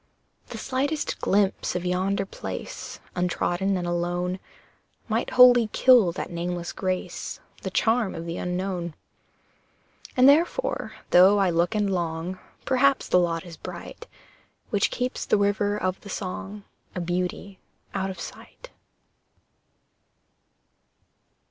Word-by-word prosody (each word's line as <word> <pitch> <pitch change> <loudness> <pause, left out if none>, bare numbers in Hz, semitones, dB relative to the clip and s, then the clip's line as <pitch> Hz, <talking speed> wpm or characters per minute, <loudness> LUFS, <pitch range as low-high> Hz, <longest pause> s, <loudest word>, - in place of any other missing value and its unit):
The - - -7
slightest 285 +4 -2
glimpse 195 -2 +1
of 180 0 -2
yonder 190 +2 0
place, - - -7 0.2
Untrodden 180 +2 0
and 175 - -3
alone, 175 +1 -1 0.7
Might 225 +1 0
wholly 250 -2 +7
kill 245 -9 +6
that 180 - -5
nameless 175 0 -3
grace, 185 -1 -3 0.2
The - - -3
charm 225 -2 +1
of 165 0 -6
the 170 0 -4
unknown. 180 -2 -3 1.2
And 255 +1 +7
therefore, 335 - +2 0.2
though 190 +3 +7
I 195 -3 +3
look 170 +6 +1
and 210 -1 +2
long, 175 -1 -2 0.3
Perhaps 270 +1 +2
the 180 - +5
lot 165 -1 0
is 170 -2 -10
bright - - -9 0.6
Which 205 -2 +2
keeps 250 0 -2
the - - +4
river 205 0 +1
of 185 -2 -2
the 200 - -11
song 200 +2 -5 0.3
A - - -2
beauty 180 +2 -3 0.3
out 190 0 -1
of 190 - -7
sight. - - -10
190 Hz, 125 wpm, -25 LUFS, 175-210 Hz, 1.2 s, wholly